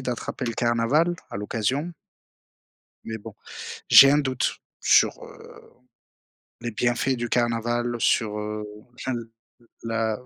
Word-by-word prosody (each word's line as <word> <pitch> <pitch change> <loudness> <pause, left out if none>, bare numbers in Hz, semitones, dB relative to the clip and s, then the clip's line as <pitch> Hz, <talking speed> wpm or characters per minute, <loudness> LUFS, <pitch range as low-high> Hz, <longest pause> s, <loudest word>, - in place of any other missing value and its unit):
d'attraper 125 0 -4
le 115 - -2
carnaval, 120 +10 +2 0.2
à - - -5
l'occasion. 120 - -2 1.1
Mais 110 0 -5
bon. 105 - -11 0.5
J'ai 135 - +10
un 145 - +4
doute 130 -3 -1 0.2
sur, - - +3
heu, - - -14 1.0
les 120 - -4
bienfaits 120 +4 0
du 120 -1 -4
carnaval, 120 0 0
sur, 105 -1 +1
heu, 105 0 -4 0.3
enfin 130 +1 -4
le 115 -1 -6 0.5
la 115 -1 -1
120 Hz, 125 wpm, -24 LUFS, 115-130 Hz, 1.1 s, J'ai